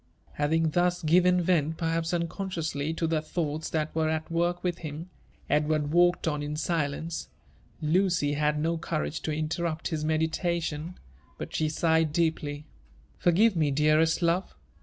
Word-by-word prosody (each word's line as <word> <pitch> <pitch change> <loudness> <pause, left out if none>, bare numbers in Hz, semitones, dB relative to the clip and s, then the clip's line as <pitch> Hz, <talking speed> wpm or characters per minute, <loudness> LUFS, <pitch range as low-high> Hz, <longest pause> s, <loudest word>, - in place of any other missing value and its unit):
Having 160 +2 +1
thus 175 +1 +1
given 180 +3 +4
vent, 160 -3 +1
perhaps 165 -1 -1
unconsciously, 170 -4 -2
to 165 - -1
the 160 -1 +1
thoughts 155 -1 -3
that 155 -1 -2
were 160 -1 +1
at 160 +1 -3
work 175 +1 0
within 175 -2 -2
him, 165 +4 -8 0.4
Edward 150 0 +1
walked 175 +1 +3
on 150 -2 0
in 145 +1 -3
silence. 160 +1 -2 0.5
Lucy 165 -2 +2
had 150 0 0
DO 165 0 0
courage 160 -1 -3
to 155 - -2
interrupt 155 +1 -2
his 155 -2 -2
meditation, 160 +1 -1 0.4
but - - -6
she 155 -1 +1
sighed 160 0 +2
deeply. 150 -2 -1 0.5
"Forgive 195 +5 +4
me, 155 -3 +2
dearest 155 +4 +3
love!" 170 - 0
160 Hz, 145 wpm, -28 LUFS, 155-170 Hz, 0.5 s, given